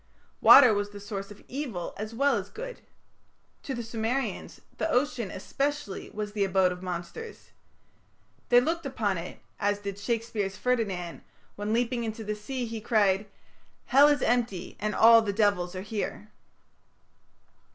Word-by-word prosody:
Water 255 -5 +9
was 205 0 -1
the 205 0 -10
source 200 -1 -6
of 205 - -13
evil 245 - -4
as 215 +1 -5
well 275 +5 +2
as - - -3
good. - - -8 0.8
To 270 - -4
the 235 - -4
Sumerians, 230 +4 -3 0.2
the - - 0
ocean 250 -6 0
especially 275 +3 -3
was 210 -1 -5
the 205 -2 +1
abode 190 -1 +3
of 180 0 -7
monsters. 185 - -7 1.0
They 245 - +7
looked 325 +4 -1
upon 205 -8 -1
it 170 - -8 0.2
as 205 0 +1
did 200 -1 -6
Shakespeare's 215 -3 -2
Ferdinand, 200 -9 -1 0.3
when, 205 +1 -3
leaping 240 +1 0
into 220 0 -4
the 210 0 -2
sea, 245 +4 -4
he 225 -1 -6
cried: 205 -3 +2 0.6
"Hell 280 +3 +6
is 290 -2 +2
empty 230 -7 0
and 210 +1 -2
all 230 0 +8
the 210 -2 -1
devils 195 -4 +1
are 185 - -5
here". 210 -1 -4
215 Hz, 150 wpm, -28 LUFS, 200-245 Hz, 1.0 s, Water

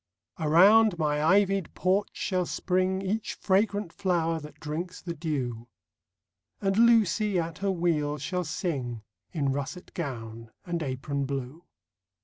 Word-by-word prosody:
Around 190 +6 +6
my 150 -2 0
ivied 195 +1 +2
porch 190 +3 +1
shall 185 -3 -1
spring 185 +1 0
Each 210 +3 -2
fragrant 200 -1 +1
flower 170 -4 0
that 150 0 -12
drinks 165 +4 -5
the 170 - -5
dew; 130 -8 -3 0.9
And 195 -1 0
Lucy, 215 -3 +4
at 165 -1 -4
her 200 +1 0
wheel, 165 -5 0
shall 180 +6 -2
sing 135 - -3 0.3
In 145 -6 0
russet 145 +6 -5
gown 115 -7 -6 0.2
and 170 -1 -2
apron 140 0 -2
blue. 140 +4 -5
170 Hz, 130 wpm, -28 LUFS, 145-190 Hz, 0.9 s, Around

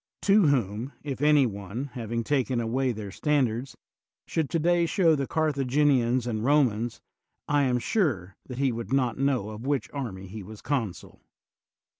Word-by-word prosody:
— - - -64
to 200 -3 +5
whom, 120 -1 0
if 140 -2 -5
any 150 -2 +5
one, 110 +5 -5
having 115 -1 -3
taken 130 -2 0
away 125 +3 0
their 105 -3 -6
standards, 130 -1 0 0.5
should 160 -4 -1
today 170 +1 +2
show 170 -3 +3
the 140 -3 -1
Carthaginians 135 -5 +2
and 110 -3 -2
Eomans, 120 -4 +2 0.5
I 145 -1 +3
am 125 -1 +2
sure 120 - -1
that 125 - -7
he 135 -1 +2
would 115 -1 -6
not 130 -4 +1
know 135 -7 +1
of 110 +5 -7
which 140 -2 -1
army 115 -10 -5
he 105 +3 -8
was 105 +2 -10
consul. 115 - -3
130 Hz, 160 wpm, -27 LUFS, 115-145 Hz, 0.5 s, to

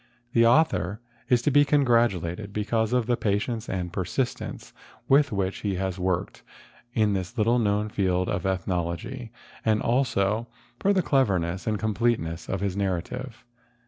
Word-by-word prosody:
The 115 0 +5
author 105 - +2 0.3
is 120 -2 +3
to 145 - +2
be 145 +1 +6
congratulated 115 - +1
because 110 +2 0
of 125 -2 +2
the 120 +1 +2
patience 110 +2 -1
and 90 -2 -3
persistence 120 +8 -3 0.3
with 145 0 +4
which 95 -2 -1
he 100 -2 -2
has 95 0 -3
worked 90 -1 -2 0.5
in 105 -3 +3
this 95 +5 -4
little 115 +3 +3
known 105 -1 +1
field 90 -3 0
of - - -2
ethnology 95 +5 -3 0.3
and 110 -1 +2
also 115 -3 +1 0.3
for 200 - +2
the 190 -3 +2
clearness 95 - +1
and 110 -1 +1
completeness 110 -6 -1
of 95 - -2
his 100 -2 -1
narrative. 115 +6 -3
105 Hz, 145 wpm, -26 LUFS, 95-120 Hz, 0.5 s, be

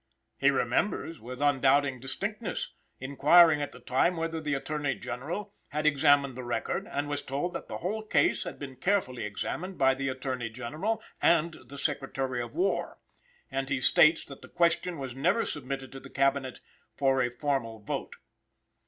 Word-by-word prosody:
He - - +5
remembers, 165 - 0
with 125 +5 -6
undoubting 140 -1 +3
distinctness, 195 - -3 0.3
inquiring 150 +4 +6
at 145 - -3
the - - -12
time 130 +8 +1
whether 165 0 -2
the 150 -2 -1
Attorney 145 -1 -2
General 170 +12 -5 0.2
had 150 +2 -2
examined 145 -2 +4
the 130 - -6
record, 120 0 -2
and 145 +1 -2
was 145 0 -2
told 145 +7 -3
that - - -6
the - - -5
whole 210 +5 -2
case 215 - +2
had - - -6
been 135 -2 -8
carefully 155 - 0
examined 175 - -4
by 135 -1 +4
the 135 +1 -2
Attorney 130 -2 -3
General 155 - -3 0.2
and 170 0 +4
the 140 +3 -9
Secretary 135 -3 -2
of 120 +3 -7
War; 185 +4 0 0.5
and 135 0 -2
he 140 - +1
states 155 +5 +5
that 140 - -11
the - - -12
question 170 0 +1
was 135 -3 -5
never 165 - +2
submitted 135 -2 -5
to 135 - -8
the - - -12
Cabinet 135 -1 0 0.3
for 135 -1 +2
a 125 - +1
formal 125 -3 -2
vote. 105 - -4
140 Hz, 170 wpm, -29 LUFS, 130-160 Hz, 0.5 s, inquiring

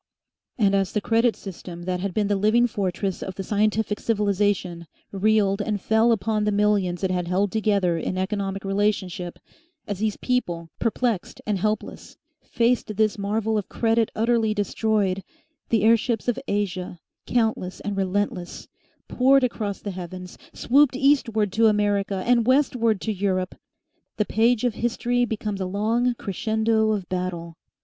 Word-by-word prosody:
And 200 -4 +3
as 195 -1 +1
the 210 - +1
credit 230 +2 +2
system, 175 -2 -9
that 180 0 -2
had 195 +1 -2
been 205 +2 0
the 205 - +1
living 215 +5 +3
fortress 195 -3 -2
of 190 - -5
the 195 - -4
scientific 210 +1 0
civilisation, 200 -5 0 0.2
reeled 205 0 +2
and 205 0 -2
fell 220 +4 +3
upon 215 0 0
the 210 - +1
millions 200 -3 +1
it 190 - +1
had 180 -1 -1
held 190 +2 +1
together 200 -6 +1
in 185 - -3
economic 195 0 -2
relationship, 195 -3 -1 0.5
as 205 -2 -4
these 215 -1 -1
people, 175 -10 -2
perplexed 230 -3 -1
and 210 -3 -1
helpless, 215 +2 -3 0.2
faced 235 -2 0
this 215 -1 +1
marvel 215 +2 0
of 200 - -7
credit 225 -1 +1
utterly 225 -1 +1
destroyed, 205 -2 0 0.5
the 225 -3 +2
airships 230 +1 +2
of 245 - 0
Asia, 185 -3 -2 0.3
countless 220 -6 0
and 205 -1 -3
relentless, 195 -2 -2 0.4
poured 270 +1 +4
across 210 -5 -2
the 205 - -4
heavens, 180 0 -8 0.2
swooped 275 +1 +3
eastward 255 -7 +2
to 225 +3 +4
America 205 -2 +1
and 240 -1 +3
westward 250 -5 +2
to 220 - -1
Europe. 185 -2 -1 0.6
The 210 - +1
page 230 +2 +2
of 245 -2 +1
history 245 +1 0
becomes 210 -3 -4
a 185 - -1
long 225 +6 0
crescendo 220 +1 0
of 200 -4 -2
battle. 180 -2 -4
210 Hz, 150 wpm, -24 LUFS, 190-225 Hz, 0.6 s, poured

